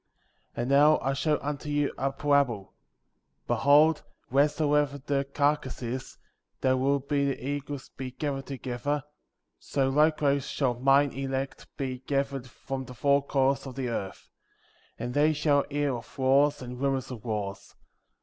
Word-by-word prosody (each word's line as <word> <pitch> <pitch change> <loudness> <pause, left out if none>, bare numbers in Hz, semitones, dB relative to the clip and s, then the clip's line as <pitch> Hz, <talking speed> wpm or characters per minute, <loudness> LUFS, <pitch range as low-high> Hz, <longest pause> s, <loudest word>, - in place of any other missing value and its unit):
27. - - -7
And 125 - -2
now 150 +2 +6
I 135 - +2
show 150 +2 +1
unto 150 +1 -4
you 145 -1 0
a 135 0 -1
parable. 135 -7 +1 0.7
Be - - +1
hold, 150 +3 +5 0.3
wheresoever 145 0 +2
the 140 0 -1
carcass 145 -3 0
is, 125 +2 -5 0.4
there 130 0 +3
will 135 +2 +2
the 140 0 0
eagles 140 +2 -5
be 130 -1 -4
gathered 135 +1 -4
together; 135 +2 -3 0.6
so 135 -1 0
likewise 145 -1 +2
shall 130 -4 0
mine 135 +3 +3
elect 135 +1 -4
be 130 -2 -3
gathered 135 -1 -2
from 130 +1 -6
the 125 - -10
four 140 +2 +3
quarters 135 0 +1
of 130 - -8
the 130 -2 -2
earth. 100 -4 -5 0.7
28. 115 - -4
And 120 - -4
they 150 +3 +4
shall 145 -2 +2
hear 145 -1 0
of 120 - -10
wars, 140 +2 +3
and 125 +1 -7
rumors 135 -2 -1
of 120 -4 -8
wars. 105 -4 -4
140 Hz, 155 wpm, -28 LUFS, 130-145 Hz, 0.7 s, now